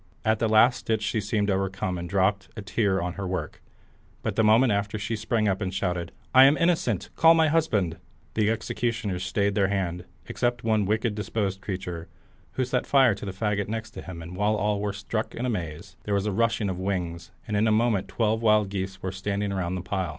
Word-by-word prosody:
At 110 Hz, 0 st, +2 dB
the 115 Hz, -, +1 dB
last 115 Hz, +3 st, +5 dB
stitch 110 Hz, -1 st, -1 dB
she 110 Hz, +1 st, 0 dB
seemed 105 Hz, 0 st, 0 dB
overcome 95 Hz, -1 st, -1 dB
and 85 Hz, 0 st, -6 dB
dropped 95 Hz, +1 st, +1 dB
a 105 Hz, -, -5 dB
tear 100 Hz, -2 st, +1 dB
on 90 Hz, 0 st, -3 dB
her 100 Hz, -1 st, -5 dB
work, 95 Hz, 0 st, -4 dB, 0.6 s
but -, -, -2 dB
the 110 Hz, -, +3 dB
moment 110 Hz, +3 st, +5 dB
after 100 Hz, +1 st, -1 dB
she 110 Hz, +2 st, -3 dB
sprang 110 Hz, 0 st, 0 dB
up, 95 Hz, +1 st, 0 dB
and 95 Hz, -2 st, -1 dB
shouted 90 Hz, -3 st, -2 dB
out, -, -, -26 dB, 0.3 s
"I -, -, +10 dB
am 140 Hz, +3 st, +5 dB
innocent; 160 Hz, -, +1 dB
call 165 Hz, +1 st, +6 dB
my 160 Hz, -1 st, +4 dB
husband!" 105 Hz, -, +1 dB, 0.4 s
The 110 Hz, -1 st, +2 dB
executioners 115 Hz, -4 st, -2 dB
stayed 100 Hz, +1 st, 0 dB
their 100 Hz, -1 st, +2 dB
hands, 90 Hz, -3 st, -2 dB, 0.2 s
except 120 Hz, 0 st, -1 dB
one 110 Hz, -2 st, +2 dB
wicked 110 Hz, +2 st, +1 dB
disposed 105 Hz, -2 st, -2 dB
creature, 90 Hz, -4 st, -5 dB, 0.5 s
who 130 Hz, -, 0 dB
set 125 Hz, 0 st, -1 dB
fire 135 Hz, -5 st, +5 dB
to 100 Hz, -, -7 dB
the -, -, -2 dB
faggot 100 Hz, +1 st, -1 dB
next 110 Hz, +1 st, -5 dB
him, 90 Hz, -7 st, -8 dB
and 85 Hz, +2 st, -9 dB
while 105 Hz, +3 st, +1 dB
all 105 Hz, 0 st, 0 dB
were 105 Hz, 0 st, -1 dB
struck 105 Hz, +2 st, -4 dB
in 120 Hz, -, -3 dB
amaze, 90 Hz, -3 st, -4 dB
there 105 Hz, -, 0 dB
was 100 Hz, 0 st, 0 dB
a 105 Hz, -, 0 dB
rushing 115 Hz, 0 st, +1 dB
of 90 Hz, -1 st, -3 dB
wings, 90 Hz, -3 st, -3 dB, 0.2 s
and 105 Hz, -, -2 dB
in 105 Hz, +2 st, +3 dB
a -, -, +3 dB
moment 110 Hz, -3 st, +2 dB
the -, -, -15 dB
twelve 110 Hz, -1 st, +1 dB
wild 105 Hz, -3 st, +3 dB
geese 95 Hz, -1 st, -5 dB
were 95 Hz, -, -2 dB
standing 100 Hz, +1 st, -2 dB
around 95 Hz, -2 st, -2 dB
the 90 Hz, -, -3 dB
pile. 95 Hz, 0 st, -2 dB
105 Hz, 220 wpm, -26 LUFS, 95-110 Hz, 0.6 s, I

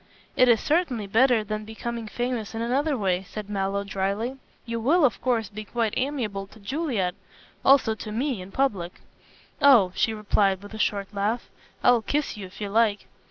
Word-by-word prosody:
"It 255 Hz, 0 st, +5 dB
is 230 Hz, -2 st, +5 dB
certainly 300 Hz, -, 0 dB
better 230 Hz, +2 st, +3 dB
than 215 Hz, 0 st, -4 dB
becoming 225 Hz, +1 st, -5 dB
famous 240 Hz, -1 st, -3 dB
in 225 Hz, -, -2 dB
another 275 Hz, +4 st, +1 dB
way," 190 Hz, -4 st, 0 dB
said 205 Hz, +2 st, -8 dB
Mallow, 200 Hz, 0 st, -1 dB
dryly, 200 Hz, +5 st, -2 dB, 0.3 s
"you 230 Hz, -1 st, -3 dB
will, 295 Hz, +8 st, +4 dB
of 255 Hz, -, 0 dB
course 235 Hz, -5 st, +1 dB
be 215 Hz, +2 st, -8 dB
quite 225 Hz, 0 st, -1 dB
amiable 235 Hz, -8 st, -2 dB
to 220 Hz, -, -17 dB
Juliet. 225 Hz, -, -1 dB, 0.5 s
Also 265 Hz, -5 st, +5 dB
to 215 Hz, 0 st, -7 dB
me, 245 Hz, -1 st, -1 dB
in 185 Hz, +2 st, -10 dB
public." 195 Hz, -10 st, 0 dB, 0.7 s
"Oh," 235 Hz, -10 st, +6 dB
she 225 Hz, -, +1 dB
replied, 200 Hz, -2 st, +1 dB
with 205 Hz, -, -11 dB
a 220 Hz, -, -7 dB
short 200 Hz, -1 st, -1 dB
laugh, 210 Hz, +4 st, -2 dB, 0.3 s
"I'll 245 Hz, -2 st, +5 dB
kiss 290 Hz, +4 st, -1 dB
you 200 Hz, -3 st, -7 dB
if 185 Hz, -, -15 dB
you 205 Hz, -1 st, -3 dB
like." 215 Hz, -1 st, +2 dB
220 Hz, 180 wpm, -25 LUFS, 200-250 Hz, 0.7 s, Oh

